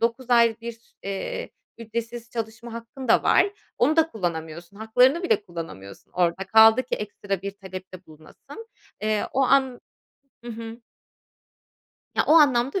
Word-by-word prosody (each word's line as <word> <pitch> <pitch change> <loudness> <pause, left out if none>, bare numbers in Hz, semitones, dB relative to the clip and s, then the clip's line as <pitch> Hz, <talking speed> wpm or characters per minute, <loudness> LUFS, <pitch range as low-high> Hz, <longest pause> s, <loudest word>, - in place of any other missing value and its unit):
9 235 +2 -1
ay 235 -2 +5
bir 235 0 -5
s 230 +1 -23
eee, 195 0 -5 0.3
ücretsiz 235 +1 -6
çalışma 225 0 -6
hakkın 230 +2 -8
da - - +5
var. - - +4 0.3
Onu 300 +6 +3
da 325 0 +4
kullanamıyorsun, 170 -1 -5
haklarını 250 - +3
bile 345 - +1
kullanamıyorsun 160 - -9
orada. 180 +1 0
Kaldı 220 +4 +6
ki - - -3
ekstra 200 -2 -5
bir 200 - -3
talepte 185 -1 -10
bulunasın. 160 - -14 0.3
Eee, 215 -1 0
o 270 - 0
an 260 -1 +2 0.7
I - - -7
hı. 230 0 -8 1.3
Ya, - - +2
o 310 - +5
anlamda 275 +2 +4
225 Hz, 145 wpm, -24 LUFS, 195-245 Hz, 1.3 s, Kaldı